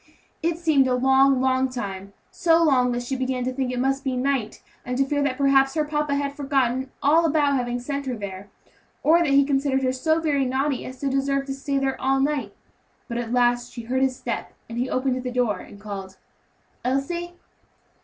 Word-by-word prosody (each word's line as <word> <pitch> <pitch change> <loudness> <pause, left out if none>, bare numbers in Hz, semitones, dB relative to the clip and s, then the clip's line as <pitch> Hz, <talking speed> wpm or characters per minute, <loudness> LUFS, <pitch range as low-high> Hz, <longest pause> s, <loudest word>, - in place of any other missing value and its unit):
It 335 0 0
seemed 310 -6 +3
a 250 - +2
long, 265 +1 +4
long 260 0 +2
time; 200 -5 -6 0.2
so 335 -1 +3
long 255 -5 +3
that 240 0 -2
she 265 +2 -3
began 255 -1 -1
to 255 +1 -2
think 255 -1 -2
it 250 - -3
must 270 +1 0
be 260 -2 -1
night, 260 -4 -1 0.2
and 250 0 -3
to 275 - +3
fear 285 +1 -1
that 275 -2 0
perhaps 270 0 +3
her 305 -1 +1
papa 295 -1 -1
had 280 0 -1
forgotten 265 -2 0
all 315 +4 +5
about 300 -3 +2
having 245 -2 -1
sent 280 +2 -4
her 255 - -1
there, 200 -2 -7 0.5
or 325 +3 +5
that 340 - +2
he 275 0 +5
considered 270 -1 +1
her 255 0 +1
so 315 +5 +1
very 295 -4 +1
naughty 265 +1 -1
as 260 0 -9
to 280 - -1
deserve 275 0 0
to 270 - -4
stay 275 +1 -2
there 270 -1 -1
all 270 0 +2
night. 270 -7 -1 0.5
But 235 -2 -3
at 235 -1 -4
last 245 0 +2
she 235 - -7
heard 255 +3 -1
his 265 -1 +2
step, 235 -2 -5
and 230 +1 -5
then - - +2
he 255 - -5
opened 255 0 0
the 250 - -4
door 240 -6 0
and 200 - -12
called, 195 -2 -7 0.7
"Elsie!" 340 +7 -2
265 Hz, 215 wpm, -24 LUFS, 250-280 Hz, 0.7 s, all